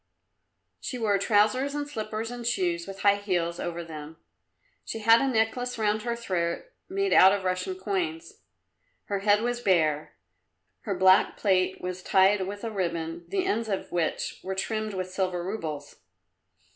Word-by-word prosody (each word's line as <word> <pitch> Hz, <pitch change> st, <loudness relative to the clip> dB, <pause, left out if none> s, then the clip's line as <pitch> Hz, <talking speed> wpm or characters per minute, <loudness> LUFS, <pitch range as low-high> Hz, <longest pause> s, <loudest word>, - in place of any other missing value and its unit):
She 250 Hz, -, -5 dB
wore 210 Hz, -4 st, +1 dB
trousers 215 Hz, +8 st, +2 dB
and 290 Hz, 0 st, -2 dB
slippers 220 Hz, -3 st, -4 dB
and 245 Hz, -1 st, -6 dB
shoes 175 Hz, -7 st, 0 dB
with 195 Hz, 0 st, -8 dB
high 200 Hz, 0 st, +5 dB
heels 175 Hz, -4 st, -1 dB
over 170 Hz, 0 st, -4 dB
them; 155 Hz, -1 st, -9 dB, 0.7 s
she -, -, -5 dB
had 225 Hz, +1 st, +5 dB
a 275 Hz, -, +1 dB
necklace 245 Hz, +1 st, 0 dB
round 215 Hz, -1 st, +1 dB
her 235 Hz, +1 st, -2 dB
throat 180 Hz, -, -2 dB, 0.2 s
made 395 Hz, +1 st, 0 dB
out 190 Hz, -, +8 dB
of 200 Hz, -1 st, -1 dB
Russian 185 Hz, 0 st, -1 dB
coins. 180 Hz, -4 st, -3 dB, 0.7 s
Her 200 Hz, -1 st, -2 dB
head 205 Hz, +2 st, +3 dB
was 240 Hz, 0 st, -1 dB
bare. 155 Hz, -7 st, +1 dB, 0.7 s
Her 200 Hz, -, -1 dB
black 190 Hz, +1 st, +5 dB
plait 185 Hz, -2 st, +1 dB
was 180 Hz, 0 st, -4 dB
tied 190 Hz, +1 st, +3 dB
with 205 Hz, +2 st, -7 dB
a 230 Hz, -, -3 dB
ribbon, 170 Hz, -3 st, -3 dB
the 380 Hz, -2 st, -1 dB
ends 230 Hz, -, -1 dB
of 195 Hz, -, -3 dB
which 170 Hz, -2 st, -2 dB
were 190 Hz, 0 st, -3 dB
trimmed 215 Hz, +1 st, -2 dB
with 185 Hz, 0 st, -4 dB
silver 185 Hz, -2 st, -1 dB
roubles. 160 Hz, -7 st, -5 dB
195 Hz, 160 wpm, -27 LUFS, 180-220 Hz, 0.7 s, out